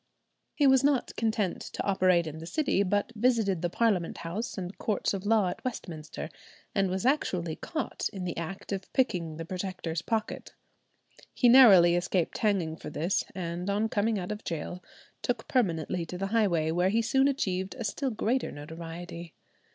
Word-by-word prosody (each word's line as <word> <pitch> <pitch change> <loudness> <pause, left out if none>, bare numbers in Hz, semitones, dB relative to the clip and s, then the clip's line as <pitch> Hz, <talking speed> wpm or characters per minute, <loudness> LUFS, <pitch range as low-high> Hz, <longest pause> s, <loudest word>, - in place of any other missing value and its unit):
He 290 - +3
was 265 -1 +6
not 280 -3 +1
content 220 -4 0
to - - -5
operate 185 -3 +3
in 160 0 -6
the 165 - -8
city, 270 - +1
but 205 +3 0
visited 215 -6 +2
the 175 - 0
Parliament 195 -4 +1
House 205 +10 -4
and 185 0 -5
Courts 210 -2 0
of 195 0 -4
Law 215 -4 +4
at - - -7
Westminster, 160 - -5 0.4
and 195 -2 +2
was 190 +4 -2
actually 180 - +1
caught 315 -5 -3
in 195 -3 -6
the 175 -2 -3
act 170 +5 -6
of 195 -1 -4
picking 170 -11 0
the 165 - -5
Protector's 180 -2 -4
pocket. 220 -1 -3 0.8
He 245 - +4
narrowly 195 -9 +8
escaped 175 -1 0
hanging 185 -7 +1
for 150 - -7
this, 165 +5 0
and 175 +1 -3
on 210 +2 +1
coming 220 +1 +1
out 180 +1 -4
of 210 +1 -5
gaol 175 +2 -5 0.4
took 245 -2 -2
permanently 175 - 0
to 180 - -6
the 195 +2 -2
highway, 175 -8 +2
where 180 +3 +2
he 225 +3 +2
soon 265 +4 +3
achieved 190 -8 -1
a 245 - -5
still 265 +6 -1
greater 240 +3 -1
notoriety. 165 +3 -8
190 Hz, 175 wpm, -29 LUFS, 170-225 Hz, 0.8 s, narrowly